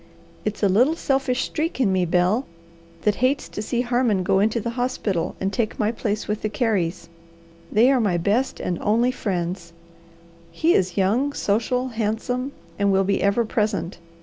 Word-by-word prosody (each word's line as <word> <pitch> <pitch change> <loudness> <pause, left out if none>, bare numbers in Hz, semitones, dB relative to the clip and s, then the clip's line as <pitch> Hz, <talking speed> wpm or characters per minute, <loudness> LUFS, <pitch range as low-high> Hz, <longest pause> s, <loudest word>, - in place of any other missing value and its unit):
It's 210 0 -3
a - - +6
little 245 - +3
selfish 270 -4 0
streak 320 -2 -3
in 210 -7 +3
me, 185 -1 +2
Bel, 180 +9 +1 0.6
that 210 - +3
hates 265 +3 +1
to - - -5
see 235 +3 -1
Harmon 240 -5 +1
go 190 +1 +2
into 220 +3 +2
the 230 +2 -3
hospital 235 -8 -2
and 195 +1 -2
take 225 -3 -1
my 215 0 +1
place 215 -2 -3
with 210 0 -2
the 215 - -1
Careys. 190 -7 -1 0.6
They 235 +5 +5
are 265 - +3
my 195 -5 +1
best 210 +10 0
and 175 -2 -2
only 230 +4 +2
friends. 175 -6 -3 0.8
He 320 - +2
is 185 0 +1
young, 230 +9 +2
social, 250 +3 0
handsome, 235 +4 -2 0.3
and 200 0 +3
will 195 0 +3
be 200 +1 0
ever 200 +4 +2
present. 210 -6 -1
215 Hz, 175 wpm, -23 LUFS, 195-250 Hz, 0.8 s, a